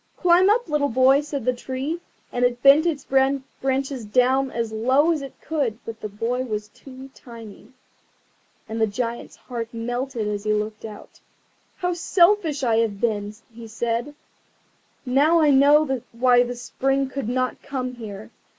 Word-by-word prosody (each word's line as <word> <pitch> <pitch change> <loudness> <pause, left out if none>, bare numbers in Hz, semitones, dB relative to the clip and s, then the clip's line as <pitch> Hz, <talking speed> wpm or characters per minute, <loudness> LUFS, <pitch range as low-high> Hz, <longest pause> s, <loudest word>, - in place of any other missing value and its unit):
"Climb 360 +2 +4
up! 460 +1 +2
little 300 -2 0
boy," 260 +3 +4
said 290 -4 -5
the 255 - +2
Tree, 265 +6 -4 0.3
and 245 - -1
it 245 0 0
bent 285 +4 +7
its 295 -5 -2
branches 270 -1 -1
down 255 +5 +2
as 230 -3 -3
low 260 +9 +2
as 315 -3 -1
it 275 -1 -10
could; 280 -9 -2
but 225 -1 -8
the 215 - -5
boy 230 +5 -2
was 210 -4 -4
too 265 +3 -13
tiny. 230 -1 -13 1.0
And 225 +1 -4
the 220 - +3
Giant's 230 +3 -4
heart 235 -3 -6
melted 240 0 -3
as 205 -1 -3
he 215 0 +1
looked 210 +1 -3
out. 215 -2 -11 0.6
"How 360 -1 -1
selfish 340 -4 +2
I 230 -3 +2
have 220 -3 0
been!" 210 -3 -1 0.2
he 230 0 -10
said; 235 +5 -3 0.9
"now 290 +6 +3
I 305 -2 +4
know 280 -1 +4
why 245 +1 +4
the 245 0 -2
Spring 270 +2 -1
would 275 -5 -3
not 255 0 -2
come 255 -2 -4
here. 215 -4 -9
255 Hz, 160 wpm, -23 LUFS, 230-280 Hz, 1.0 s, bent